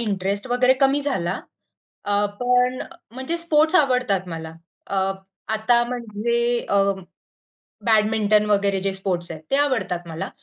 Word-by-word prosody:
Interest 200 -1 -2
वगैरे 250 +1 +4
कमी 275 +1 +3
झाला. 190 -12 -1 0.6
अ, 205 0 +1 0.2
पण 250 +1 +2
अ, - - -9 0.3
म्हणजे 265 +6 -3
स्पोर्ट्स 320 -1 +2
आवडतात 250 - +2
मला. 160 -1 -6 0.3
अ, 195 - -3 0.6
आता 235 +2 +3
म्हणजे 235 0 -1
अ, - - 0 1.1
बॅडमिंटन 215 -1 +3
वगैरे 200 -1 +2
जे 195 0 -1
स्पोर्ट्स 185 -3 -2
आहेत, 155 -1 -8
ते - - +4
आवडतात 225 -12 0
मला. 160 0 -5
220 Hz, 130 wpm, -22 LUFS, 195-250 Hz, 1.1 s, वगैरे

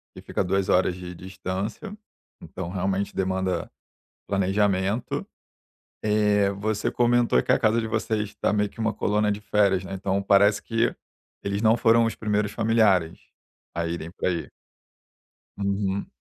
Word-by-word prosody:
que - - -10
fica - - -2
há - - +2
2 95 +1 0
horas 90 0 +3
de 90 -1 -8
distância, 95 - -5 0.5
então, 90 -2 -7
realmente, 95 +2 -2
demanda 95 -2 -1 0.6
planejamento. 100 +2 0 0.8
Eh, 105 -1 +3
você 105 +1 -1
comentou 120 - +3
que - - -4
a - - +5
casa 110 +2 +2
de 110 - -4
vocês 110 -1 -1
está 105 - -1
meio 105 -1 +1
que - - -23
uma 110 -1 0
colônia 105 0 +1
de 100 - -5
férias, 100 -2 +2
né, 95 - -6
então, 95 +1 -1
parece 100 +1 +4
que 115 0 0 0.5
eles 100 +1 -2
não 110 0 +4
foram 115 0 +4
os 115 - -1
primeiros 105 -1 -1
familiares 105 -7 +2 0.6
a 85 - -1
irem 85 -1 -4
para - - -2
aí? 85 -2 -3 1.1
Uhum. 100 0 -1
100 Hz, 150 wpm, -25 LUFS, 95-110 Hz, 1.1 s, a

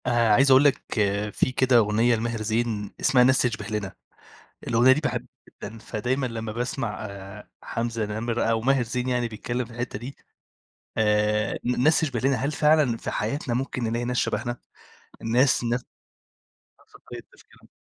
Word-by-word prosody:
آآ، 120 -3 +3
عايز 135 +5 +5
أقول 130 +2 +7
لك 145 -2 +3 0.5
في 130 - 0
كده 130 -1 +3
أغنية 115 +2 +3
لماهر 115 0 -3
زين 110 -2 -1
اسمها 130 -2 +4
"ناس 130 +1 +4
تشْبِه 115 -4 -1
لنا" 105 -3 -4 0.7
الأغنية 120 +3 +5
دي 145 +4 +3
باحبها 150 - -3 0.2
جدًا، 110 +2 -10
فدايمًا 125 +5 -2
لمّا 115 -2 -4
باسمع 115 -2 -3
آآ، 100 0 -10
حمزة 115 -1 -2
نَمِرة 110 +3 -2
أو 115 0 +1
ماهر 135 +1 +2
زين 125 +2 -3
يعني 125 -1 0
بيتكلّم 120 +3 -4
في 115 - -15
الحِتّة 120 -3 -4
دي، 130 +4 -8 0.8
آآ 105 0 +1
ن 125 0 0
ناس 155 +3 +5
تشْبِه 135 -7 -1
لنا، 135 +3 +2
هل 140 +3 -1
فعلًا 150 -5 +3
في - - -5
حياتنا 120 +3 -2
ممكن 125 0 -2
نلاقي 115 +1 -1
ناس 125 0 -2
شبهنا، 120 0 -1 0.7
ناس 120 +3 +2
نفْس 120 +1 -1 1.3
طريقة - - -8
تفكيرنا؟ - - -22
120 Hz, 160 wpm, -25 LUFS, 110-130 Hz, 1.3 s, أقول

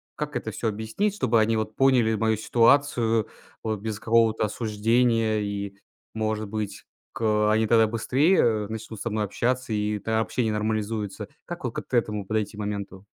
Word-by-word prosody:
Как 150 -1 -4
это 110 - -3
всё 115 - -3
объяснить, 110 - -1
чтобы 120 - +2
они 110 +1 +2
вот 110 0 -2
поняли 125 -5 +4
мою 110 +1 +1
ситуацию 115 -1 +3 0.4
вот 110 -2 -2
без 110 0 -4
какого-то 115 -1 +3
осуждения 110 +1 +1
и, 100 -1 -4 0.4
может 110 -1 -2
быть, 105 -2 -4 0.3
к - - -8
э, 105 -1 +3
они 110 +1 +3
тогда 110 0 +4
быстрее, 135 - +2
э, 110 -3 +2
начнут 110 0 -7
со 120 - -3
мной 110 -1 -1
общаться 125 +4 -1
и 105 0 -1
тогда 110 +2 0
общение 110 0 0
нормализуется? 105 -1 -2 0.2
Как - - -7
вот, - - -2
как - - -6
т - - -3
этому 105 -3 -1
подойти 105 0 -2
моменту? 100 -2 -5
110 Hz, 175 wpm, -25 LUFS, 105-115 Hz, 0.4 s, поняли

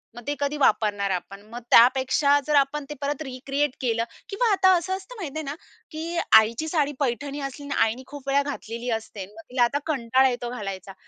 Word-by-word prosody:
मग 240 - -8
ते 290 - 0
कधी 285 +1 -1
वापरणार 205 -7 +2
आपण. 190 +2 -4
मग 240 - -6
त्यापेक्षा, 265 +4 +5
जर 300 - +2
आपण 280 +1 +2
ते - - -4
परत 285 +1 -2
रिक्रिएट 275 +1 -2
केलं 230 -2 0 0.3
किंवा 435 +3 +1
आता 380 -1 +4
असं 350 +2 -3
असतं, 390 +6 -12
माहिती 315 -7 -6
आहे - - -4
ना, 280 +1 -4 0.4
की 330 +2 -4 0.2
आईची 230 +8 -1
साडी, 300 -3 +1
पैठणी 280 +2 -2
असली 275 +1 -6
आणि 285 - -1
आईनी 225 +4 -2
खूप 285 -2 -11
वेळा 275 +1 +3
घातलेली 240 -4 -5
असते, 205 -3 -9
मग 210 +3 -14
तिला 250 -1 +2
आता 280 +4 +1
कंटाळा 260 -3 +2
येतो 245 -1 -4
घालायचा. 195 -5 -6
275 Hz, 200 wpm, -25 LUFS, 235-295 Hz, 0.4 s, त्यापेक्षा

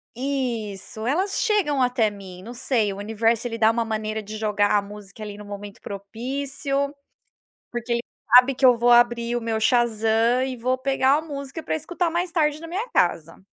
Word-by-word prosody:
Isso, 235 -5 -3
elas 365 - 0
chegam 295 - +2
até 245 -3 +2
mim, 190 -3 -11
não 235 +5 -9
sei, 235 -4 0
o 195 - -7
universo 225 +3 0
ele 230 -1 -5
dá 220 - +5
uma 230 0 0
maneira 215 -1 -3
de 215 +1 -7
jogar 210 -1 +1
a 205 - +4
música 205 0 -11
ali 205 -1 -6
no 210 - -10
momento 205 0 -8
propício, 275 +7 -3 0.8
porque 240 0 -4
ele 235 - +1 0.3
sabe 250 +2 +8
que 265 - +4
eu 250 -2 +6
vou 240 +1 +2
abrir 240 0 +4
o 240 - -1
meu 225 -1 -2
Shazam 230 +1 +2
e 260 -1 -4
vou 255 +2 0
pegar 270 +1 +2
a - - -1
música 280 -1 -7
para 315 - -2
escutar 340 +2 -2
mais 345 +1 -2
tarde 300 -3 +1
na 330 - -8
minha 380 +8 -3
casa. 165 - 0
240 Hz, 190 wpm, -24 LUFS, 215-275 Hz, 0.8 s, sabe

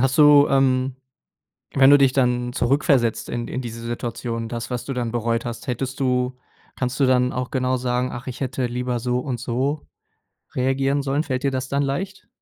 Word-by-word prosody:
Hast 135 +3 +1
du, 145 -1 +7
ähm, 130 -1 +2 0.8
wenn 135 0 +6
du 145 - +8
dich 135 -2 +4
dann 125 -2 +1
zurückversetzt 120 -3 +1
in 120 -1 -3
d - - -8
in 130 - -2
diese 115 -1 -7
Situation, 115 -1 -4
das 115 -1 -5
was 125 -2 -3
du 135 - -3
dann 120 -2 -2
bereut 115 0 -1
hast. 120 +5 -6
Hättest 130 +2 -3
du 125 -1 0 0.4
kannst 125 +2 -3
du 135 - +5
dann 125 0 +3
auch 125 0 -4
genau 130 -1 0
sagen: 125 0 -1
„Ach, 120 +2 -8
ich 125 +1 -6
hätte 130 -1 -1
lieber 125 0 -2
so, 125 +1 0
und 125 -2 -4
so, 130 +5 -2 0.7
reagieren 135 +2 +1
sollen.“ 140 +3 0
Fällt 130 -3 -3
dir 140 - +1
das 130 0 -3
dann 140 +1 0
leicht? 190 +8 -4
125 Hz, 200 wpm, -22 LUFS, 120-135 Hz, 0.8 s, du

